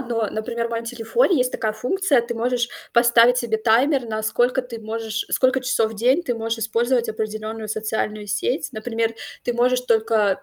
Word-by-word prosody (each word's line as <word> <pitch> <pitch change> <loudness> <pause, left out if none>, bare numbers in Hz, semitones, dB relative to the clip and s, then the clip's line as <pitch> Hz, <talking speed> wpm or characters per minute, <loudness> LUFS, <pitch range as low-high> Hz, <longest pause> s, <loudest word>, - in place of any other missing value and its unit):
но, 235 -4 -1
например, 230 +2 -3
в 235 - -8
моем 230 0 -3
телефоне 245 - +1
есть 250 0 +1
такая 215 -1 -1
функция: 270 - +1
ты 235 0 -5
можешь 240 +1 0 0.2
поставить 235 0 +5
себе 230 -3 0
таймер, 245 +5 +2
на 215 -1 -3
сколько 245 +4 +1
ты 235 -2 -8
можешь 220 0 -4
сколько 260 0 +2
часов 225 -3 0
в - - -9
день 255 +10 +2
ты 245 -6 -1
можешь 225 0 -3
использовать 230 +2 0
определенную 215 0 -4
социальную 215 -1 -3
сеть. 225 - -1
Например, 225 0 -2 0.3
ты 245 - 0
можешь 250 +1 +2
только 220 -4 +1
230 Hz, 180 wpm, -22 LUFS, 220-245 Hz, 0.3 s, поставить